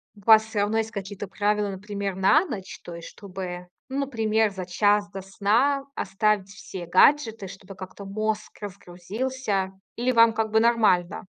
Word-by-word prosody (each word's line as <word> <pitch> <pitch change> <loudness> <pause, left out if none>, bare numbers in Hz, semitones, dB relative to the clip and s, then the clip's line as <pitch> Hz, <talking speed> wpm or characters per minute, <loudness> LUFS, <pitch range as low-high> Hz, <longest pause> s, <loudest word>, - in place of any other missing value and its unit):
у 205 - -17
вас 220 -1 +8
всё 220 -2 -3
равно 210 +2 +1
есть 220 0 -1
какие-то 200 0 -6
правила, 205 +1 0
например, 200 0 -4
на 195 - +4
ночь? 210 - -7
То 175 - -8
есть, 170 - -9
чтобы, 180 -2 -7 0.2
ну, 270 +1 -2
например, 220 -5 +1
за 185 -2 -6
час 205 +2 +2
до 195 -1 -7
сна 230 +9 +1
оставить 200 0 0
все 190 -3 -8
гаджеты, 225 - +3
чтобы 195 +1 -11
как-то 185 +1 -9
мозг 215 +1 -2
разгрузился. 200 +2 -3 0.2
Или 245 +2 +1
вам 230 -1 +6
как 220 -1 -1
бы 220 - +4
нормально? 210 -6 +2
205 Hz, 165 wpm, -25 LUFS, 190-220 Hz, 0.2 s, вас